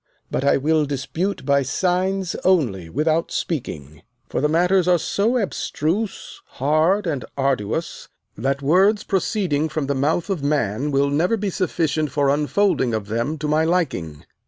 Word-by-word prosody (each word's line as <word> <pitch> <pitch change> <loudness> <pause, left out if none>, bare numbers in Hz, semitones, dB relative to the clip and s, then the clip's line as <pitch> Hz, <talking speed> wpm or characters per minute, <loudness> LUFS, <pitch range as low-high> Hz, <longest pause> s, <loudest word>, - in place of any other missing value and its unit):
But - - -1
I 140 - +4
will 150 +2 +1
dispute 160 +8 -3
by 140 -1 +3
signs 185 +6 0
only 120 - +1
without 155 - 0
speaking, 80 - -4 0.3
for - - -1
the 150 - +2
matters 180 +3 +3
are 180 -1 +5
so 215 +8 0
abstruse, 200 -1 -2 0.2
hard, 155 +9 +2
and 145 -7 -2
arduous, 135 +2 -2 0.3
that 135 +5 -2
words 190 +8 +3
proceeding 180 -6 0
from 155 -2 -2
the 140 - 0
mouth 155 +8 0
of 180 -6 -2
man 140 -2 0
will 140 0 +1
never 175 +10 +2
be 200 -2 -2
sufficient 160 -5 -1
for 140 0 +1
unfolding 145 - +1
of 105 -2 -5
them 120 +8 -1
to 150 +1 -3
my 155 +1 +2
liking. 135 - -1
155 Hz, 155 wpm, -22 LUFS, 140-180 Hz, 0.3 s, are